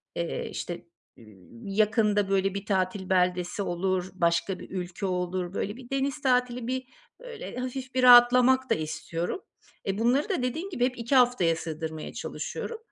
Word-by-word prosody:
eee, 170 Hz, -1 st, -3 dB
işte, 175 Hz, -, -6 dB, 0.3 s
iii, 115 Hz, -, -11 dB
yakında, 210 Hz, -2 st, +3 dB
böyle, 195 Hz, 0 st, +1 dB
bir 200 Hz, 0 st, -5 dB
tatil 190 Hz, -1 st, -1 dB
beldesi 180 Hz, +1 st, +1 dB
olur, 185 Hz, 0 st, -1 dB
başka 170 Hz, +1 st, +1 dB
bir -, -, -10 dB
ülke 180 Hz, +1 st, -4 dB
olur, 180 Hz, 0 st, -2 dB
böyle, 205 Hz, +3 st, -3 dB
bir 250 Hz, -2 st, -12 dB
deniz 275 Hz, +2 st, -1 dB
tatili, 250 Hz, -2 st, +1 dB
bir, 260 Hz, 0 st, -2 dB, 0.4 s
böyle, -, -, -8 dB
hafif 255 Hz, +1 st, -5 dB
bir 255 Hz, -, +2 dB
rahatlamak 250 Hz, +1 st, +7 dB
da -, -, +4 dB
istiyorum. 165 Hz, -, -4 dB, 0.5 s
E, 195 Hz, +1 st, -1 dB
bunları 260 Hz, -, +2 dB
da 315 Hz, -10 st, 0 dB
dediğin 320 Hz, +10 st, -2 dB
gibi 250 Hz, -9 st, +1 dB
hep 250 Hz, -1 st, -2 dB
2 235 Hz, +4 st, 0 dB
haftaya 245 Hz, -10 st, +4 dB
sığdırmaya 160 Hz, -1 st, -5 dB
çalışıyorum. 460 Hz, -, -5 dB
200 Hz, 160 wpm, -27 LUFS, 180-250 Hz, 0.5 s, rahatlamak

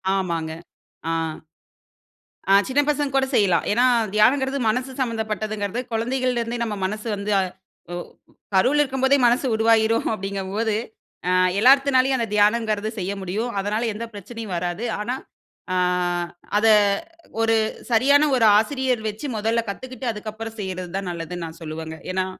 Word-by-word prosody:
ஆமாங்க. 170 Hz, -4 st, -2 dB, 0.6 s
ஆ. -, -, 0 dB, 1.4 s
ஆ -, -, +7 dB
சின்ன 265 Hz, +2 st, +1 dB
பசங்க 290 Hz, -2 st, 0 dB
கூட 270 Hz, 0 st, +3 dB
செய்யலாம். 185 Hz, -7 st, +3 dB
ஏனா, 240 Hz, +4 st, +3 dB, 0.3 s
தியானங்குறது 265 Hz, +6 st, +3 dB
மனசு 255 Hz, +4 st, -1 dB
சம்மந்தப்பட்டதுங்கறது. 215 Hz, -2 st, -2 dB
குழந்தைகள்ல 250 Hz, +2 st, 0 dB
இருந்தே 235 Hz, +1 st, -3 dB
நம்ம 215 Hz, -2 st, -3 dB
மனசு 215 Hz, +4 st, -4 dB
வந்து 200 Hz, +1 st, -3 dB, 0.6 s
ஒ -, -, -3 dB, 0.6 s
கருவுல 265 Hz, +10 st, +4 dB
இருக்கும்போதே 265 Hz, 0 st, +2 dB
மனசு 245 Hz, +3 st, +2 dB
உருவாகிடும் 225 Hz, 0 st, +3 dB
அப்டிங்கும் 195 Hz, -2 st, -4 dB
போது. 220 Hz, -2 st, +1 dB, 0.5 s
ஆ -, -, +2 dB, 0.3 s
எல்லாத்துனாலும் 265 Hz, +1 st, +5 dB
அந்த 230 Hz, -2 st, -1 dB
தியானம்ங்கறது 215 Hz, 0 st, +2 dB
செய்ய 190 Hz, +2 st, -2 dB
முடியும். 210 Hz, +6 st, -2 dB
அதனால 210 Hz, +4 st, -1 dB
எந்த 225 Hz, +3 st, -5 dB
பிரச்சனையும் 210 Hz, 0 st, -7 dB
வராது. 175 Hz, +6 st, -3 dB
ஆனா, 240 Hz, +4 st, -2 dB, 0.6 s
ஆ -, -, 0 dB, 0.8 s
அத 220 Hz, -, +3 dB, 0.7 s
ஒரு 225 Hz, 0 st, +3 dB, 0.4 s
சரியான 285 Hz, +6 st, +5 dB
ஒரு 225 Hz, -, +4 dB
ஆசிரியர் 260 Hz, 0 st, 0 dB
வச்சி 210 Hz, +7 st, -7 dB
முதல்ல 225 Hz, +2 st, 0 dB
கத்துக்கிட்டு, 255 Hz, +4 st, -7 dB
அதுக்கப்புறம் 220 Hz, +1 st, -7 dB
செய்வறது 185 Hz, -2 st, -5 dB
தான் 195 Hz, -2 st, -4 dB
நல்லதுனு 170 Hz, 0 st, -5 dB
நான் 165 Hz, +1 st, -10 dB
சொல்லுவேங்க. 160 Hz, 0 st, -6 dB, 0.2 s
ஏனா, 185 Hz, 0 st, 0 dB
220 Hz, 135 wpm, -23 LUFS, 200-250 Hz, 1.4 s, ஆ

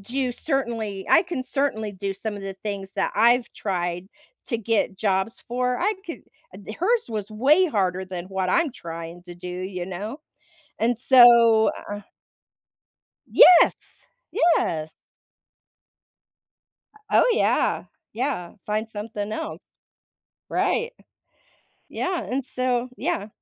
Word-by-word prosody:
do 250 Hz, +5 st, -2 dB
certainly 230 Hz, -9 st, -3 dB
I -, -, +6 dB
can 345 Hz, -8 st, -4 dB
certainly 255 Hz, -6 st, -2 dB
do 195 Hz, 0 st, -4 dB
some 210 Hz, +2 st, -5 dB
of 200 Hz, -, -8 dB
the 195 Hz, 0 st, -5 dB
things 195 Hz, -1 st, -6 dB
that -, -, -1 dB
I've 235 Hz, +3 st, +3 dB
tried 175 Hz, -2 st, -3 dB, 0.4 s
to 235 Hz, -, -1 dB
get 220 Hz, -3 st, 0 dB
jobs 190 Hz, +2 st, -1 dB
for. 250 Hz, +1 st, -1 dB
I 425 Hz, -, +1 dB
could" 335 Hz, -, -7 dB, 0.4 s
D 215 Hz, -, -7 dB
hers 440 Hz, -, 0 dB
was 210 Hz, -1 st, -4 dB
way 285 Hz, +12 st, +4 dB
harder 190 Hz, -, 0 dB
than 180 Hz, -2 st, -6 dB
what 190 Hz, -1 st, -2 dB
I'm 320 Hz, -, +2 dB
trying 170 Hz, -3 st, -8 dB
to 175 Hz, -1 st, -10 dB
do, 175 Hz, +1 st, -9 dB
you 180 Hz, 0 st, -5 dB
know? 205 Hz, -, -6 dB, 0.6 s
And 235 Hz, +2 st, +1 dB
so, 235 Hz, -3 st, +7 dB, 0.2 s
uh 205 Hz, 0 st, -4 dB, 1.3 s
Yes! 355 Hz, -2 st, +5 dB, 0.2 s
Yes. 165 Hz, -, +1 dB, 2.1 s
Oh, -, -, +5 dB
yeah. 450 Hz, -, +1 dB, 0.3 s
Yeah, 215 Hz, -7 st, -3 dB
find 215 Hz, +1 st, -1 dB
something 210 Hz, -1 st, -5 dB
else. 320 Hz, -, -5 dB, 0.9 s
Right. 475 Hz, +1 st, 0 dB, 1.0 s
Yeah, 370 Hz, -2 st, -2 dB
and 265 Hz, +1 st, -3 dB
so 255 Hz, -1 st, -1 dB
yeah. 205 Hz, -, -2 dB
220 Hz, 125 wpm, -24 LUFS, 190-255 Hz, 2.1 s, so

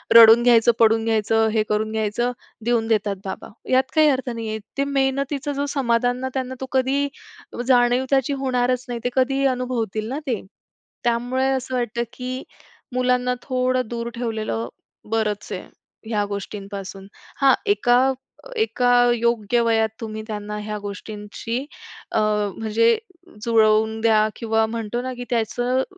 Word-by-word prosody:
रडून 230 Hz, +1 st, +9 dB
घ्यायचं, 235 Hz, -1 st, +6 dB
पडून 225 Hz, 0 st, +4 dB
घ्यायचं, 225 Hz, 0 st, +2 dB
हे 215 Hz, -1 st, +2 dB
करून 215 Hz, +1 st, 0 dB
घ्यायचं 220 Hz, +3 st, 0 dB, 0.3 s
देऊन 235 Hz, -2 st, +1 dB
देतात 210 Hz, -3 st, +1 dB
बाबा 190 Hz, -, -6 dB, 0.2 s
यात 260 Hz, +1 st, +5 dB
काही 310 Hz, -1 st, +6 dB
अर्थ 260 Hz, -2 st, 0 dB
नाहीये. 220 Hz, -2 st, -4 dB, 0.2 s
ते 275 Hz, -, +2 dB
मेहनतीचं 275 Hz, +1 st, -1 dB
जो 285 Hz, +1 st, -1 dB
समाधान 245 Hz, -1 st, +1 dB
ना 260 Hz, 0 st, -3 dB
त्यांना 260 Hz, -1 st, -3 dB
तो -, -, -2 dB
कधीही 270 Hz, +2 st, +1 dB, 0.6 s
जाणीव 245 Hz, 0 st, +4 dB
त्याची 270 Hz, 0 st, +2 dB
होणारच 255 Hz, -2 st, 0 dB
नाही. 240 Hz, -1 st, -3 dB
ते 245 Hz, -, +1 dB
कधी 270 Hz, +1 st, +2 dB
अनुभवतील 225 Hz, -4 st, -2 dB
ना 275 Hz, +3 st, -3 dB
ते. 235 Hz, -5 st, -1 dB, 0.6 s
त्यामुळे 245 Hz, +3 st, +1 dB
असं 260 Hz, -1 st, -2 dB
वाटतं, 235 Hz, -1 st, -1 dB
की 255 Hz, +1 st, -5 dB, 0.5 s
मुलांना 250 Hz, 0 st, +1 dB
थोडं 255 Hz, -2 st, 0 dB
दूर 235 Hz, 0 st, -3 dB
ठेवलेलं 220 Hz, -, -2 dB, 0.4 s
बरंच 215 Hz, -2 st, -1 dB
आहे, -, -, -4 dB, 0.5 s
ह्या 210 Hz, -2 st, +1 dB
गोष्टींपासून. 200 Hz, -1 st, -6 dB, 0.3 s
हां, 270 Hz, -2 st, +6 dB, 0.2 s
एका 245 Hz, +5 st, +3 dB, 0.4 s
एका 255 Hz, -, +1 dB, 0.2 s
योग्य 235 Hz, -1 st, +1 dB
वयात 225 Hz, -1 st, +2 dB
तुम्ही 220 Hz, -1 st, -5 dB
त्यांना 210 Hz, -1 st, -5 dB
ह्या 210 Hz, 0 st, -4 dB
गोष्टींची 210 Hz, +3 st, -6 dB, 0.5 s
अ, -, -, +1 dB, 0.4 s
म्हणजे 225 Hz, -, +3 dB, 0.5 s
जुळवून 220 Hz, -1 st, +3 dB
द्या 215 Hz, -1 st, +4 dB
किंवा 225 Hz, -1 st, +1 dB
म्हणतो 230 Hz, +1 st, -3 dB
ना 255 Hz, 0 st, -3 dB
की 245 Hz, 0 st, -6 dB
त्याचं 245 Hz, +3 st, 0 dB
235 Hz, 140 wpm, -22 LUFS, 220-255 Hz, 0.6 s, रडून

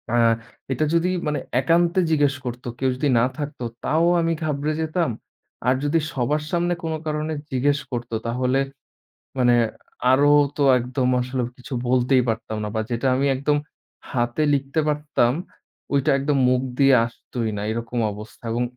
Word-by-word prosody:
আ -, -, +3 dB, 0.6 s
এটা 155 Hz, -, 0 dB
যদি 170 Hz, +2 st, +2 dB, 0.2 s
মানে 150 Hz, 0 st, 0 dB, 0.2 s
একান্তে 170 Hz, +5 st, +3 dB
জিজ্ঞেস 145 Hz, -3 st, +3 dB
করত, 125 Hz, 0 st, -5 dB, 0.2 s
কেউ 130 Hz, 0 st, +2 dB
যদি 140 Hz, +2 st, 0 dB
না 115 Hz, -, +4 dB
থাকতো, 145 Hz, -3 st, -5 dB, 0.2 s
তাও 160 Hz, +3 st, +2 dB, 0.2 s
আমি 165 Hz, 0 st, +1 dB
ঘাবড়ে 150 Hz, 0 st, -1 dB
যেতাম। 160 Hz, 0 st, 0 dB, 0.6 s
আর 130 Hz, -, +4 dB
যদি 150 Hz, +3 st, +2 dB
সবার 145 Hz, +4 st, 0 dB
সামনে 175 Hz, 0 st, +1 dB
কোনো 160 Hz, -1 st, -2 dB
কারণে 155 Hz, 0 st, -2 dB, 0.2 s
জিজ্ঞেস 140 Hz, +2 st, +2 dB
করত, 120 Hz, -1 st, -4 dB, 0.2 s
তাহলে 125 Hz, +3 st, +1 dB, 0.8 s
মানে 120 Hz, -1 st, +4 dB, 0.6 s
আরো 145 Hz, +2 st, +5 dB, 0.3 s
তো 145 Hz, -, +2 dB, 0.2 s
একদম, 125 Hz, +1 st, -1 dB
আসলে 125 Hz, +1 st, -2 dB, 0.2 s
কিছু 130 Hz, +1 st, -9 dB, 0.2 s
বলতেই 125 Hz, 0 st, +3 dB
পারতাম 110 Hz, -1 st, -3 dB
না। 105 Hz, -, -2 dB
বা 110 Hz, -, +1 dB
যেটা 120 Hz, +3 st, 0 dB
আমি 135 Hz, -, +1 dB
একদম 145 Hz, +3 st, +1 dB, 0.5 s
হাতে 120 Hz, +4 st, 0 dB
লিখতে 140 Hz, +3 st, 0 dB
পারতাম, 150 Hz, -5 st, +1 dB, 0.6 s
ঐটা 140 Hz, +2 st, +2 dB
একদম 140 Hz, +1 st, +1 dB
মুখ 125 Hz, 0 st, +2 dB, 0.2 s
দিয়ে 135 Hz, -1 st, +6 dB
আসতই 115 Hz, 0 st, -5 dB
না, -, -, -3 dB
এরকম 115 Hz, +1 st, -3 dB
অবস্থা 105 Hz, +3 st, -11 dB
এবং 120 Hz, +2 st, 0 dB
135 Hz, 155 wpm, -23 LUFS, 125-150 Hz, 0.8 s, দিয়ে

